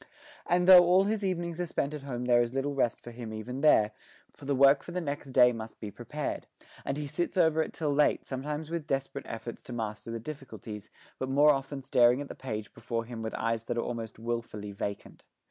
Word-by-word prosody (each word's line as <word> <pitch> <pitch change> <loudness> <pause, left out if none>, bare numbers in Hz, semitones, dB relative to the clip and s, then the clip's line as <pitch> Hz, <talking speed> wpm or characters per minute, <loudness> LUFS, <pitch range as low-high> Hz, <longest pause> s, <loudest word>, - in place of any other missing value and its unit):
And 180 +1 +2
though 185 -1 +11
all 180 +2 +5
his 210 +1 -1
evenings 175 -2 -2
are 175 - -2
spent 145 -2 -2
at 150 - -5
home 125 -3 -4
there 120 -1 +5
is 120 +2 -2
little 140 +1 0
rest 125 -4 0
for 120 - -9
him 115 -2 -7
even 120 +5 -5
there, 110 -8 +5 0.4
for 140 - -13
the 140 0 +1
work 140 +1 +6
for - - -9
the 180 - -2
next 145 -4 -4
day 125 -1 +6
must 110 -1 -7
be 105 -2 -6
prepared; - - -5 0.4
and 140 - -2
he 150 - -3
sits 175 +6 -2
over 160 -2 +4
it - - -3
till 150 -3 -1
late, 150 +1 +2
sometimes 150 +4 -4
with 165 -3 -3
desperate 135 -1 -3
efforts 115 +1 -6
to 125 - -9
master 110 -1 -4
the 115 0 -3
difficulties, 115 -6 -8 0.3
but 130 - -2
more 145 +3 +6
often 135 0 -3
staring 125 -1 +4
at 145 - -6
the - - -5
page 110 -5 -6
before 115 -1 -3
him 115 -1 -7
with 110 0 -4
eyes 115 0 -1
that 120 - -2
are 115 - +1
almost 115 -2 -5
wilfully 115 -3 -4
vacant. 100 0 -6
135 Hz, 225 wpm, -30 LUFS, 115-150 Hz, 0.4 s, though